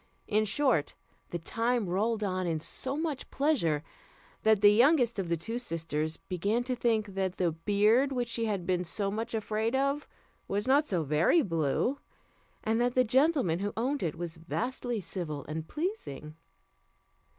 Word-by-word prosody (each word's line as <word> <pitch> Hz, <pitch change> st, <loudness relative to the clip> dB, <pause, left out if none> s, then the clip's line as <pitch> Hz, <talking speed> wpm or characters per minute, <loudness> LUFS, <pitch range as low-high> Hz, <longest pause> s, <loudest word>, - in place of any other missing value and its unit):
In 215 Hz, 0 st, +2 dB
short, 225 Hz, -, +1 dB, 0.3 s
the 175 Hz, -, -3 dB
time 230 Hz, +5 st, 0 dB
rolled 215 Hz, +5 st, 0 dB
on 185 Hz, -2 st, -1 dB
in 160 Hz, -2 st, 0 dB
so 265 Hz, -, -4 dB
much 310 Hz, -4 st, -3 dB
pleasure, 205 Hz, -, +1 dB, 0.6 s
that 220 Hz, -2 st, +4 dB
the 205 Hz, 0 st, +8 dB
youngest 245 Hz, -1 st, +4 dB
of 180 Hz, -3 st, -2 dB
the 170 Hz, -, +1 dB
two 225 Hz, +9 st, -4 dB
sisters 160 Hz, -6 st, -2 dB
began 200 Hz, +6 st, -1 dB
to 255 Hz, 0 st, -2 dB
think 220 Hz, -4 st, 0 dB
that 190 Hz, -1 st, -2 dB
the 175 Hz, -2 st, +2 dB
beard 210 Hz, -, +3 dB
which 245 Hz, -2 st, -1 dB
she 230 Hz, 0 st, -1 dB
had 200 Hz, -5 st, -2 dB
been 180 Hz, 0 st, +1 dB
so 195 Hz, +3 st, -2 dB
much 225 Hz, +3 st, -3 dB
afraid 220 Hz, +2 st, -1 dB
of, 275 Hz, +2 st, 0 dB, 0.4 s
was 205 Hz, +4 st, -1 dB
not 285 Hz, +3 st, +4 dB
so 175 Hz, -5 st, 0 dB
very 155 Hz, -, +3 dB
blue, 165 Hz, -, 0 dB, 0.6 s
and 225 Hz, +2 st, +1 dB
that 245 Hz, 0 st, +1 dB
the 255 Hz, -, +5 dB
gentleman 255 Hz, -, +2 dB
who 205 Hz, +1 st, -2 dB
owned 265 Hz, +5 st, 0 dB
it 165 Hz, -2 st, -1 dB
was 170 Hz, -1 st, -5 dB
vastly 240 Hz, +6 st, -3 dB
civil 160 Hz, -6 st, -5 dB
and 155 Hz, +1 st, -5 dB
pleasing. 300 Hz, -, -4 dB
215 Hz, 165 wpm, -30 LUFS, 175-245 Hz, 0.6 s, the